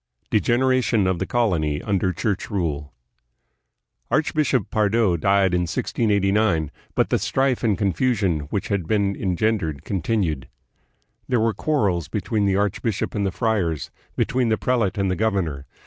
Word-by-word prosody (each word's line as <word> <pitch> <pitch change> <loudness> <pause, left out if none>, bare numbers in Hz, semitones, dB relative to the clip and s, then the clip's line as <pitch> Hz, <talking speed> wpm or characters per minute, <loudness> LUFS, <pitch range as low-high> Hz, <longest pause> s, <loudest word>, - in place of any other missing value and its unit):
Degeneration 120 -1 +2
of 95 -2 0
the - - -2
Colony 85 -11 +1
under 95 -3 0
Church 100 +4 -2
Rule. 80 -8 -2 1.2
Archbishop 145 - +1
Pardo 105 -3 +2
died 95 +2 +2
in 90 -1 0
1689, 100 -6 +1 0.2
but - - +1
the - - +3
strife 135 -2 0
and 105 -5 +2
con 100 -1 +1
fusion 95 - 0
which 100 - -3
had 100 -6 -1
been 100 -1 +1
engendered 90 -6 -1
continued. 90 - -1 0.8
There 125 -2 +2
were 110 0 +2
quarrels 100 - 0
between 105 -2 -1
the 95 - +2
archbishop 100 +1 -1
and 100 -2 0
the - - -1
friars, 90 - -1 0.2
between 125 -2 +1
the 110 - +2
prelate 115 -7 0
and 100 -1 +1
the - - 0
governor. 90 -10 -1
100 Hz, 145 wpm, -23 LUFS, 90-110 Hz, 1.2 s, the